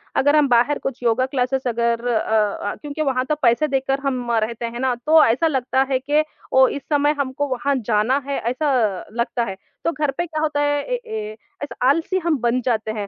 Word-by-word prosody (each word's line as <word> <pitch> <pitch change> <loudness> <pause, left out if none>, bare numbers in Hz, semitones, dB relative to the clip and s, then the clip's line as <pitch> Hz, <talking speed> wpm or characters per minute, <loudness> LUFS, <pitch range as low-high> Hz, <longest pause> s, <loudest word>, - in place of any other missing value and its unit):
अगर 290 +2 +3
हम 300 -2 +4
बाहर 245 +3 +3
कुछ 270 -1 -5
योगा 240 +2 +2
क्लासेस 260 0 -1
अगर 235 0 0
अ 240 -2 +2 0.5
अ, - - -6
क्योंकि 295 +1 -5
वहाँ 260 -3 0
तो 305 - +2
पैसे 240 +5 +3
देकर 270 -1 0
हम 250 -3 -1
रहते 230 +1 -1
हैं 235 +1 -5
ना, 260 0 +1
तो 305 +6 +4
ऐसा 245 +8 +2
लगता 265 -3 0
है 260 - +2
कि 290 +3 +1 0.3
ओ, 260 0 +6
इस 285 - -4
समय 290 0 +3
हमको 280 +1 -1
वहाँ 275 +2 -1
जाना 220 +4 +2
है, 280 - -1
ऐसा 265 +5 -1 0.4
लगता 235 +1 -1
है। 195 -4 -4 0.3
तो 335 - +2
घर 295 -2 -1
पे 345 - 0
क्या 310 -2 -4
होता 300 -2 0
है, 290 0 +1
ए - - -2 0.2
ए 215 0 -4 0.3
ऐसा 285 - -6
आलसी 330 +6 +1
हम 335 -3 0
बन 240 +1 +1
जाते 225 -3 -1
हैं 210 -2 -4
265 Hz, 215 wpm, -21 LUFS, 235-290 Hz, 0.5 s, ओ